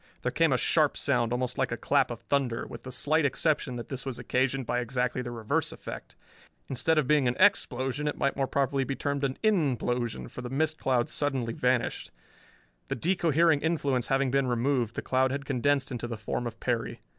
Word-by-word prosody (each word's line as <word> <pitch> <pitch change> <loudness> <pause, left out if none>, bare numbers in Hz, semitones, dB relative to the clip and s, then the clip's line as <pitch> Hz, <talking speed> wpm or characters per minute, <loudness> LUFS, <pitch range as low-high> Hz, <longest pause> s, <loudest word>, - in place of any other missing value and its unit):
There - - 0
came - - +3
a - - +3
sharp - - +2
sound 120 -1 +1
almost 125 0 -1
like - - +1
a - - -2
clap - - +2
of - - -6
thunder, 130 -5 0
with - - -9
the 130 - -8
slight 155 +5 +1
exception 145 -2 0
that 120 - -7
this 135 -2 -4
was 135 -3 -4
occasioned 130 +2 0
by 120 - 0
exactly 125 0 -1
the 120 - -5
reverse 115 -3 -1
effect. - - -9 0.5
Instead 155 +5 +1
of 155 - +3
being 145 -1 +3
an 120 - +1
_ex_plosion 145 -7 +2
it - - -5
might 140 - 0
more 135 -1 0
properly 135 0 +1
be 135 +1 -3
termed 140 0 -2
an 135 -1 -1
_in_plosion, 125 - 0
for - - -8
the 125 - -6
mist 155 +4 0
cloud 130 -1 +1
suddenly 135 -6 -1
vanished. 125 0 0 0.8
The - - -2
de 180 +10 +1
cohering 165 -2 +3
influence 145 -7 0
having 135 -1 +1
been 135 -1 +2
removed, 120 -1 0
the - - -3
cloud 130 0 +2
had 140 +1 -3
condensed 140 +1 +1
into 120 -1 -3
the 115 -2 -5
form 120 +3 -3
of 115 - -8
Perry. 120 -2 -2
130 Hz, 205 wpm, -28 LUFS, 125-145 Hz, 0.8 s, came